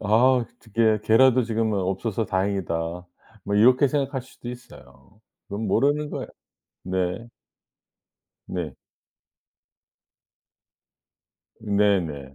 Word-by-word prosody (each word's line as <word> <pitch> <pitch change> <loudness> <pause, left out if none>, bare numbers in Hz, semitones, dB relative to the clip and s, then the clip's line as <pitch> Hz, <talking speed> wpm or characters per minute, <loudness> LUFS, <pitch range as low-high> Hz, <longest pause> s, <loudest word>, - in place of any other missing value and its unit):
'아 100 - -5 0.3
어떻게 110 -1 0
걔라도 130 +2 +5
지금은 110 -2 -1
없어서 95 +4 -2
다행이다.' 95 -3 -1 0.7
뭐 100 - -2
이렇게 125 +6 +5
생각할 135 -2 -1
수도 125 -1 -12
있어요. 120 -3 -13 0.3
그건 105 +2 -4
모르는 145 +7 +1
거예요. - - -5 0.5
네. 95 +5 -2 1.2
네. 85 -7 -4 2.9
네네 95 -10 0
110 Hz, 200 characters per minute, -24 LUFS, 95-120 Hz, 2.9 s, 걔라도